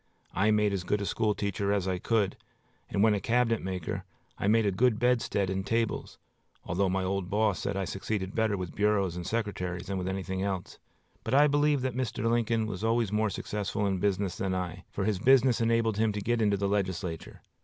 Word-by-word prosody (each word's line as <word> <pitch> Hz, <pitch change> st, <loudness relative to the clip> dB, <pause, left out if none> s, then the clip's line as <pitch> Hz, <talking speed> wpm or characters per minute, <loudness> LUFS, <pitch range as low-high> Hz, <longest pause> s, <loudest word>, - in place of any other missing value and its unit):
I 105 Hz, +3 st, +2 dB
made 105 Hz, -1 st, +3 dB
as 95 Hz, -2 st, -2 dB
good 105 Hz, +3 st, 0 dB
a 100 Hz, -, -2 dB
school 105 Hz, +3 st, 0 dB
teacher 100 Hz, 0 st, -1 dB
as 100 Hz, -2 st, 0 dB
I 90 Hz, -1 st, -1 dB
could, 105 Hz, -2 st, +1 dB, 0.5 s
and, 100 Hz, -, +1 dB
when 110 Hz, -1 st, +5 dB
a 105 Hz, -, 0 dB
cabinet 115 Hz, -1 st, +2 dB
maker, 90 Hz, -3 st, -4 dB, 0.3 s
I -, -, -2 dB
made 110 Hz, +1 st, +4 dB
a 100 Hz, -, +2 dB
good 115 Hz, +4 st, +2 dB
bedstead 120 Hz, -5 st, +1 dB
and 95 Hz, +1 st, -2 dB
tables, 115 Hz, +2 st, -1 dB, 0.5 s
although 95 Hz, +2 st, 0 dB
my 95 Hz, 0 st, 0 dB
old 95 Hz, -1 st, -2 dB
boss 105 Hz, -3 st, +1 dB
said -, -, -2 dB
I 95 Hz, -, -1 dB
succeeded 95 Hz, 0 st, -3 dB
better 110 Hz, -2 st, +1 dB
with 90 Hz, -2 st, -5 dB
bureaus 100 Hz, -4 st, +1 dB
and 90 Hz, -1 st, -5 dB
secretaries 90 Hz, -6 st, -2 dB
than 95 Hz, 0 st, -3 dB
with 90 Hz, -, -3 dB
anything 95 Hz, 0 st, -3 dB
else; 95 Hz, -2 st, -3 dB, 0.4 s
but 115 Hz, -, 0 dB
I 145 Hz, +2 st, +7 dB
believe 145 Hz, -1 st, +2 dB
that 130 Hz, -3 st, -2 dB, 0.2 s
Lincoln 115 Hz, 0 st, +1 dB
was 105 Hz, -2 st, -5 dB
always 115 Hz, -2 st, +1 dB
more 105 Hz, 0 st, +1 dB
successful 105 Hz, 0 st, -3 dB
in 95 Hz, -2 st, 0 dB
business 100 Hz, -2 st, 0 dB
than 95 Hz, -1 st, -1 dB
I, 90 Hz, 0 st, -4 dB
for 100 Hz, -, -3 dB
his 105 Hz, -3 st, 0 dB
business 130 Hz, 0 st, +4 dB
enabled 115 Hz, -2 st, +2 dB
him 110 Hz, -1 st, +3 dB
to 105 Hz, -, -3 dB
get 115 Hz, +3 st, 0 dB
into 105 Hz, -2 st, +2 dB
the 100 Hz, 0 st, 0 dB
legislature. 95 Hz, -4 st, -3 dB
100 Hz, 210 wpm, -29 LUFS, 95-110 Hz, 0.5 s, I